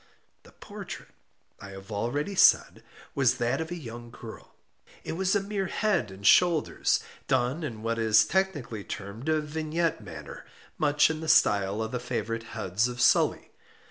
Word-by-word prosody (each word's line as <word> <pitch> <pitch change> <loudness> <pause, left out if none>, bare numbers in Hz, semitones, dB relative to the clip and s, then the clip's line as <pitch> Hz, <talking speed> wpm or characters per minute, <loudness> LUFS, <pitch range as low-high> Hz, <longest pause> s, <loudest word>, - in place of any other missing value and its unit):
The - - -19
portrait, - - -9 0.5
I 100 - -10
have 95 +2 -11
already 120 - -2
said, 190 - +4 0.3
was 130 -2 +2
that 120 +3 -1
of 160 - -5
a 175 - -4
young 120 -6 -9
girl. 115 -1 -12 0.5
It - - -5
was 190 +4 0
a - - +4
mere 200 -1 -2
head 195 - 0
and 95 +1 -11
shoulders, 170 - +3 0.3
done 125 +7 +1
in 115 -8 -6
what 115 0 -1
is 110 -1 +5
technically 145 - -1
termed 100 +10 -6
a 155 0 +3
vignette 155 0 -2
manner; 85 -6 -9 0.4
much 150 +1 +3
in 155 - -5
the 160 - -6
style 100 -6 +3
of 110 - -5
the 125 - -2
favorite 115 -2 -3 0.2
heads 95 +6 0
of 120 0 -7
Sully. - - +3
125 Hz, 165 wpm, -27 LUFS, 110-160 Hz, 0.5 s, is